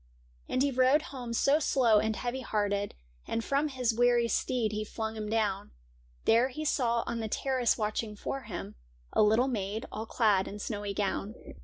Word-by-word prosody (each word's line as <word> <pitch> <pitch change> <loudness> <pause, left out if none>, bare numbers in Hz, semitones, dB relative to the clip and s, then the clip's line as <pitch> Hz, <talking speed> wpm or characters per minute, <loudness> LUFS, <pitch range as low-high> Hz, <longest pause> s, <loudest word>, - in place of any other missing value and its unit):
And 255 - +1
he 285 - +2
rode 260 +4 +4
home 245 -3 -6
so 275 +6 +3
slow 245 -8 +4
and 220 +1 0
heavy 245 +3 -3
hearted. 205 -3 -1 0.3
And 230 - -1
from 280 +5 +1
his 255 -5 0
weary 240 0 +3
steed 230 -2 0
he 215 0 -2
flung 220 +1 -4
him 215 -1 -4
down; 205 - -1 0.5
There 235 +3 +4
he 305 +4 -5
saw 235 -5 +1
on 235 -1 -3
the 220 - -2
terrace 255 +1 +1
watching 215 0 -2
for 270 +6 -4
him 175 - -6 0.4
A - - +4
little 220 +5 +4
maid 215 -3 -2
all 220 +1 -5
clad 210 -6 +2
in 205 - -6
snowy 205 -1 -4
gown. 205 +2 -2
225 Hz, 180 wpm, -30 LUFS, 210-255 Hz, 0.5 s, rode